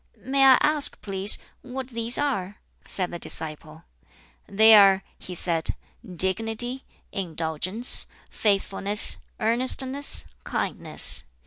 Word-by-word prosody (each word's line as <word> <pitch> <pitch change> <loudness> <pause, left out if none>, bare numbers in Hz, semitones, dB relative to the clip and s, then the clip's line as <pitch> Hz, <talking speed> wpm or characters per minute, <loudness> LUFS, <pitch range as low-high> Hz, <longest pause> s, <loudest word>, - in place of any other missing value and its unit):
"May 270 +1 0
I 260 -1 +6
ask, 300 -1 +1
please, 195 0 +2 0.2
what 260 0 -8
these 230 0 -2
are?" 205 -9 -4 0.3
said 180 -2 0
the 175 - -8
disciple. 155 -2 -5 0.6
"They 220 +2 +4
are," 195 -2 +5 0.2
he 180 - -10
said, 165 -2 -2 0.4
"dignity, 225 +8 +1 0.3
indulgence, 180 +5 0 0.2
faithfulness, 200 0 +1 0.2
earnestness, 255 - +2 0.2
kindness. 65 - 0
210 Hz, 100 wpm, -23 LUFS, 185-250 Hz, 0.6 s, I